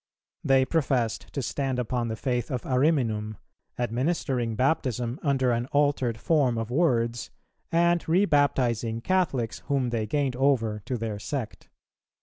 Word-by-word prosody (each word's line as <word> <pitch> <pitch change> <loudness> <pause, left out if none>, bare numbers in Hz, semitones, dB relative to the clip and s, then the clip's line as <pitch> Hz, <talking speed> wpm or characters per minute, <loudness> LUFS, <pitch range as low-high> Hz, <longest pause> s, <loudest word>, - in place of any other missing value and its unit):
They 135 -1 +4
professed 130 -7 -1
to 140 - -2
stand 135 0 -2
upon 120 0 -1
the 110 - -3
faith 125 -1 -2
of 125 -2 -3
Ariminum, 125 -7 +1 0.4
administering 125 -1 -1
Baptism 125 -1 0
under 135 -4 +1
an 120 +1 -1
altered 145 -5 +1
form 135 -3 +2
of 115 +1 -3
words, 120 -6 +1 0.4
and 170 0 +2
re 185 +5 +4
baptizing 120 - +1
Catholics 150 -10 0
whom 135 -4 0
they 110 -2 -1
gained 140 +1 0
over 120 -6 +1
to 125 - -2
their 110 -2 -4
sect. 130 0 -5
125 Hz, 135 wpm, -26 LUFS, 115-145 Hz, 0.4 s, They